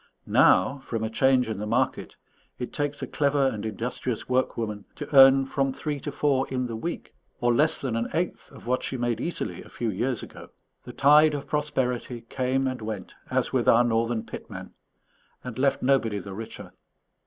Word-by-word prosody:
Now, 135 +10 +4
from 115 -4 -4
a 110 - -2
change 130 +1 +3
in 110 -3 -4
the 105 - -4
market, 115 - -1 0.4
it 125 - -6
takes 145 -1 -2
a - - 0
clever 140 -2 +1
and 105 -5 -5
industrious 115 +2 -4
workwoman 115 -5 -1
to 145 -1 -6
earn 135 0 +8
from 135 0 0
three 145 +2 -4
to 145 - -5
four 140 -2 +1
in 130 -1 -2
the 115 -2 -4
week, 170 +10 -5 0.3
or 120 -1 +2
less 155 +6 +2
than 130 -4 -2
an 115 0 -1
eighth 175 +2 -2
of - - -14
what 125 +2 0
she 130 - -3
made 120 -1 -1
easily 170 - -4
a - - -14
few 115 -2 -3
years 120 +5 -2
ago. - - -11 0.4
The - - -9
tide 150 +2 +5
of 145 0 -5
prosperity 130 -5 -2
came 130 +3 -1
and 130 -2 -3
went, 110 -4 -6 0.2
as - - 0
with - - +2
our 120 +1 +6
northern 115 -1 0
pitmen, - - -9 0.7
and 125 -1 -6
left 140 0 +1
nobody 125 -6 +2
the 100 0 -7
richer. 110 +3 -8
125 Hz, 190 wpm, -26 LUFS, 115-140 Hz, 0.7 s, earn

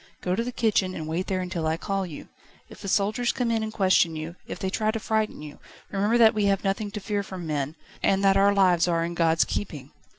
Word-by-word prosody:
Go 180 - -1
to 230 - 0
the 250 - -4
kitchen, 205 -6 +1
and 155 - -5
wait 170 +4 -2
there 185 -1 -1
until 175 -3 -3
I 160 +1 0
call 195 +1 -2
you. 155 - -9 0.4
If - - -13
the 200 - -6
soldiers 215 +5 +1
come 245 -2 -1
in 225 -1 +1
and 220 0 -3
question 185 -5 +3
you, 155 +2 -6
if - - -5
they 190 - -3
try 215 +1 0
to 225 +1 -1
frighten 220 -7 -1
you, 150 -1 -10 0.3
remember 205 +4 +2
that 225 -1 +6
we 210 -2 +1
have 195 -1 +1
nothing 200 +1 -1
to 210 - -5
fear 205 0 -2
from 190 -3 -7
men, 150 -1 -2 0.3
and 195 0 +2
that 195 -1 +5
our 200 +1 +5
lives 185 -4 +3
are 165 -1 +1
in 170 - -4
God's 165 -1 +3
keeping." 145 -9 -5
195 Hz, 245 wpm, -26 LUFS, 170-210 Hz, 0.4 s, that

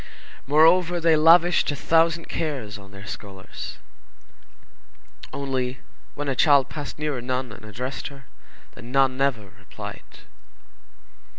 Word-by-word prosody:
Moreover, 165 +4 +4
they 165 -1 +4
lavished 165 +3 +5
a 145 - -1
thousand 165 +2 +2
cares 125 -10 -4
on 100 0 -14
their 100 0 -12
scholars. 95 -1 -8 1.5
Only, 130 -2 -3 0.4
when 145 0 -4
a 135 - 0
child 140 -1 +4
passed 145 -3 -7
near 150 -3 -2
a - - -6
nun 125 0 -3
and 110 +1 -12
addressed 125 +5 -5
her, 140 -2 -12 0.5
the - - -13
nun 130 +2 +2
never 130 -7 -1
replied. 100 - -10
135 Hz, 125 wpm, -24 LUFS, 120-155 Hz, 1.5 s, lavished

